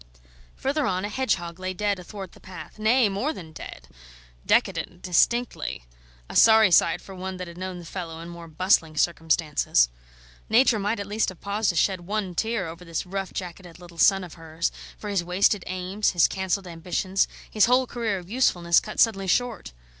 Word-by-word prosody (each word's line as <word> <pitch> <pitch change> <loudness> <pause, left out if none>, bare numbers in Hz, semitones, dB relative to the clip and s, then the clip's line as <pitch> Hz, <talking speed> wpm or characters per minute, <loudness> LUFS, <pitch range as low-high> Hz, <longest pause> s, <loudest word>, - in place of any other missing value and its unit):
Further 280 +1 -1
on, 185 0 -1
a - - -3
hedgehog 185 -8 -2
lay 185 0 -4
dead 205 -1 0
athwart 190 0 -8
the - - -17
path 185 +2 -11
nay, 225 +2 +4
more 205 +11 -1
than 165 - -10
dead; 65 - -10 0.6
decadent, 180 0 0
distinctly; 185 - +1 0.4
a - - -9
sorry 220 -3 +7
sight 170 -1 +4
for 195 - -11
one 185 0 -6
that 180 -1 -6
had 170 - -10
known 185 -1 -5
the 175 - -10
fellow 165 -2 -6
in 165 - -8
more 170 -1 -9
bustling 160 -1 +1
circumstances. 155 - +2 0.6
Nature 230 0 +4
might 205 +2 -1
at 200 - -3
least 210 +1 0
have 185 - -11
paused 205 +1 -1
to 175 - 0
shed 185 +1 +1
one 195 0 -3
tear 220 0 -1
over 165 +2 -9
this 165 -2 -4
rough 195 +1 -4
jacketed 175 -2 -7
little 175 -1 -14
son 195 +1 +5
of 175 - -9
hers, 165 0 -3 0.3
for 210 - -8
his 200 -4 0
wasted 185 +2 +2
aims, 185 +3 -1
his 175 -2 +5
cancelled 190 0 -2
ambitions, 180 +3 -1 0.2
his 215 - +4
whole 250 +2 +3
career 230 -5 -2
of 180 -2 -9
usefulness 175 -7 +3
cut 215 - -8
suddenly 195 -4 +3
short. 245 - 0
185 Hz, 185 wpm, -25 LUFS, 170-210 Hz, 0.6 s, sorry